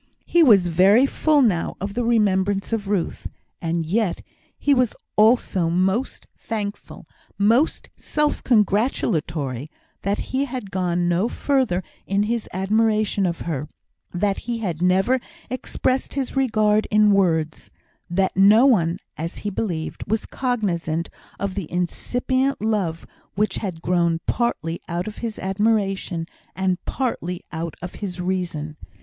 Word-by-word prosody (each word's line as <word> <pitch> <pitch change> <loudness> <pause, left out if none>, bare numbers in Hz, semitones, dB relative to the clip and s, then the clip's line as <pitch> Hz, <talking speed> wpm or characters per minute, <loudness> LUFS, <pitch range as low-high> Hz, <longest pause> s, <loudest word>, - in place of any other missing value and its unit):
He 345 - +3
was 210 - +6
very 190 +9 +5
full 295 0 +3
now 185 -8 +1
of 200 +1 -4
the 245 - -1
remembrance 205 -3 +1
of 210 -3 -1
Ruth; 195 -4 -2 0.3
and 165 0 -1
yet 195 +2 0 0.3
he 285 - +3
was 250 -4 +2 0.2
also 210 -6 +3
most 190 +8 0
thankful, 205 -2 -5 0.3
most 230 +9 +2
self 300 -1 -1
gratulatory, 165 - +1 0.3
that 200 +2 0
he 270 +2 +1
had 250 -7 -6
gone 175 -1 0
no 175 +5 +2
further 250 -9 0 0.2
in 200 +1 +2
his 230 +1 -2
admiration 210 +1 +1
of 170 -1 -3
her 150 -3 -3 0.4
that 195 +2 0
he 235 - 0
had 175 -7 -3
never 190 +8 +3 0.3
expressed 255 +1 -1
his 270 -2 -2
regard 215 -5 +2
in 210 0 +5
words 165 -5 +1 0.4
that 190 +2 +1
no 205 +6 +6
one, 180 -10 +3 0.2
as 165 +3 -4
he 205 - 0
believed, 175 -6 -3
was 220 +1 -1
cognisant 175 -10 -2 0.3
of 200 -1 -2
the 185 -5 -5
incipient 255 +9 -1
love 200 -7 -1 0.3
which 205 -1 0
had 180 -6 -5
grown 170 -2 +2
partly 170 -9 -1
out 175 +2 -2
of 215 - -7
his 230 -2 -4
admiration, 195 -4 0 0.3
and 190 -1 -1
partly 180 -9 -3
out 165 0 -4
of 180 - -6
his 185 -3 -4
reason. 175 -4 -2
195 Hz, 135 wpm, -23 LUFS, 175-225 Hz, 0.4 s, was